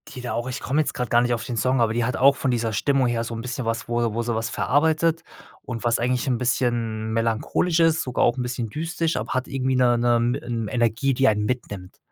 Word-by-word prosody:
die 125 - -6
da 120 -3 -4
auch 120 +2 -3
ich 125 - -4
komme 145 +4 +1
jetzt - - -3
gerade 125 -3 -3
gar 120 0 +4
nicht 120 0 +1
auf 115 -1 -3
den 120 -1 -5
Song, 125 +1 +1
aber 110 -1 +2
die 120 0 0
hat 125 - -1
auch 140 +2 +5
von 135 - -1
dieser 115 -2 -1
Stimmung 135 +4 +2
her 115 -1 -1
so 115 - -6
'n 115 - -5
bisschen 125 0 -4
was, 115 0 -2
wo 120 -2 0
wo 115 - -1
sie 120 0 -2
was 115 0 -2
verarbeitet 160 +4 +1 0.4
und 115 -3 -6
was 120 -1 +1
eigentlich 125 +1 0
'n 125 -2 +1
bisschen 120 -3 -1
melancholisch 115 +9 0
ist, 165 -1 +3
sogar 125 - -1
auch 120 +2 +1
'n - - -1
bisschen 120 -2 -3
düstern, 165 +4 -2
aber 105 +3 -3
hat 130 0 -1
irgendwie 130 -1 -1
'ne 125 -1 +3
'ne 120 0 +2 0.3
'n 115 -3 -3
Energie, 120 +3 +1
die 135 +1 +2
einen 105 -1 +2
mitnimmt. 100 -6 -5
120 Hz, 255 wpm, -23 LUFS, 115-130 Hz, 0.4 s, auch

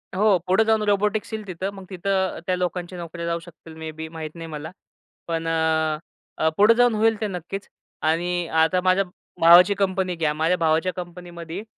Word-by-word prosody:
हो, 200 -1 +4
पुढे 190 +4 +4
जाऊन 220 -1 +3
रोबोटिक्स 210 +2 +1
येईल 215 -1 -4
तिथं. 185 +1 -3
मग 195 -1 -10
तिथं 190 0 -1
त्या 185 - +2
लोकांच्या 180 0 -3
नोकऱ्या 170 0 -6
जाऊ 170 0 -1
शकतील, 165 -1 -14
मे 160 0 -6
बी, 160 +1 -7
माहीत 160 -1 -7
नाही 165 -1 -7
मला. 155 0 -7 0.6
पण 165 -1 -2
अ, 160 -1 +1 0.4
अ, 160 - +2
पुढे 210 +3 +7
जाऊन 245 -1 +4
होईल 220 0 +2
ते 215 - 0
नक्कीच. 195 +1 -6 0.3
आणि 175 +2 0
आता 180 +3 +3
माझ्या 185 +1 +3 0.4
भावाची 175 +4 +8
कंपनी 190 -2 -1
घ्या. 160 -3 0
माझ्या 160 +4 +1
भावाच्या 165 +2 +1
कंपनीमध्ये 175 0 -7
175 Hz, 180 wpm, -23 LUFS, 165-195 Hz, 0.6 s, भावाची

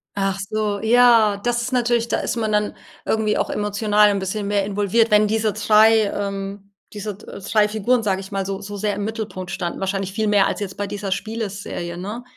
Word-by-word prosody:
Ach 195 -1 0
so, 210 -2 -1
ja. 230 -3 +5
Das 240 0 0
ist 255 - -4
natürlich 240 -1 +1
da - - 0
ist - - -2
man 220 -2 -1
dann 210 0 0 0.3
irgendwie 220 -1 +1
auch - - -1
emotional 210 0 +2
'n 200 - 0
bisschen 200 +2 -3
mehr 205 -1 +1
involviert, 205 +3 +1
wenn 210 0 +4
diese 215 -1 0
3 215 +1 +5
ähm, 200 0 -5 0.2
diese 210 -1 -5
d - - -15
3 210 +1 +2
Figuren 220 +3 +1
sage 195 -2 0
ich 195 +1 -11
mal 195 -1 -2
so 195 +1 -4
so 205 0 -7
sehr 205 0 -1
im 205 0 -3
Mittelpunkt 215 -5 -5
standen. 175 -3 -4
wahrscheinlich 195 0 -2
viel 215 +1 -1
mehr 205 -2 +4
als - - -2
jetzt 195 -2 -5
bei 205 - -2
dieser 200 -1 -5
Spieleserie, 200 -5 -4
ne? 210 +7 -6
210 Hz, 210 wpm, -21 LUFS, 195-220 Hz, 0.3 s, ja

